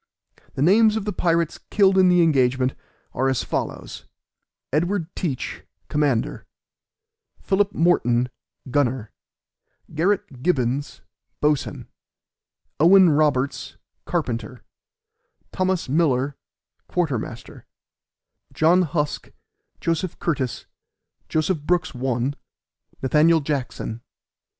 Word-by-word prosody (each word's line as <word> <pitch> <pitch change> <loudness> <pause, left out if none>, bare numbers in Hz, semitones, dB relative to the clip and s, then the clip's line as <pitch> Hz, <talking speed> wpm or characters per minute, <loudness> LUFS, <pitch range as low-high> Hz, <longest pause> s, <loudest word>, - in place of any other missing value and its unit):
The 135 - 0
names 215 +5 +5
of 220 -2 -2
the 210 - -2
pirates 170 -2 0
killed 195 -2 +4
in 185 -1 +5
the 180 -1 +5
engagement, 130 -4 +2 0.4
are 135 +1 +1
as 130 - 0
follows: - - -4 0.7
Edward 175 +2 -1
Teach, 145 -8 -3 0.3
commander; 145 -6 0 0.9
Philip 200 0 0
Morton, 125 -8 +2 0.4
gunner; 130 -5 0 0.8
Garret 160 -6 -1
Gibbens, 140 -3 -1 0.4
boatswain; 150 -1 0 0.9
Owen 180 +2 +7
Roberts, 145 -3 0 0.3
carpenter; 125 -8 -3 0.9
Thomas 185 -2 -1
Miller, 140 -2 +1 0.5
quartermaster; 130 -9 -3 0.9
John 170 +4 +4
Husk, 150 -3 -2 0.5
Joseph 165 +1 -2
Curtice, 140 -7 -2 0.6
Joseph 160 +2 0
Brooks 175 +1 0
(1), 125 +1 -1 0.7
Nath. 155 +4 +4
Jackson. 125 -5 -3
150 Hz, 90 wpm, -23 LUFS, 130-175 Hz, 0.9 s, Owen